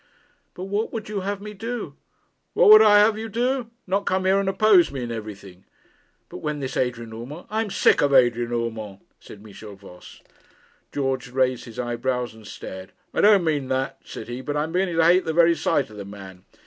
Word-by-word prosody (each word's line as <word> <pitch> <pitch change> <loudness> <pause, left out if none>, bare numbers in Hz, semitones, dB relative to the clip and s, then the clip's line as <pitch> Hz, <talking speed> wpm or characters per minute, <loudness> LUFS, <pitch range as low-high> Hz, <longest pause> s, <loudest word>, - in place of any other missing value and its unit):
'But 180 - -7
what 205 +3 -2
would 220 -2 -6
you 210 -1 -3
have 200 +2 -3
had - - -19
me 210 0 -7
do?' 230 +4 -6 0.6
'What - - +5
would 215 0 +10
I 210 -1 +6
have 210 +2 +5
had 215 - -7
you 225 - -6
do? 245 +2 -1 0.2
Not 195 +2 -1
come 185 0 0
here 190 +1 +3
and 195 -1 0
oppose 195 -2 +4
me 135 -3 -5
in 120 - -5
everything.' 100 -4 -9 0.6
'But - - -9
when 150 +5 -3
this 130 -2 -5
Adrian 115 -3 -2
Urmand 130 +9 -9
' - - -35
'I 220 +1 0
am 220 - -3
sick - - +3
of 145 - +2
Adrian 120 -2 +3
Urmand,' 110 -4 -4 0.2
said 105 - -14
Michel 105 -1 -11
Voss. 95 -2 -15 0.7
George 135 -3 -2
raised 125 -1 0
his 115 - -12
eyebrows 125 0 -2
and 110 -2 -15
stared. 95 -1 -9 0.2
'I - - +1
don't 205 -3 +5
mean 150 -5 -1
that,' 130 0 -2
said - - -9
he; 120 +2 -6
'but 145 +2 -3
I 150 - +1
am 160 - -5
beginning 180 -1 -1
to 165 - +4
hate 180 +2 +4
the 160 - -2
very 170 +1 +5
sight 145 -5 -1
of 105 - -12
the 100 - -6
man. 95 -2 -12
140 Hz, 225 wpm, -23 LUFS, 115-195 Hz, 0.7 s, would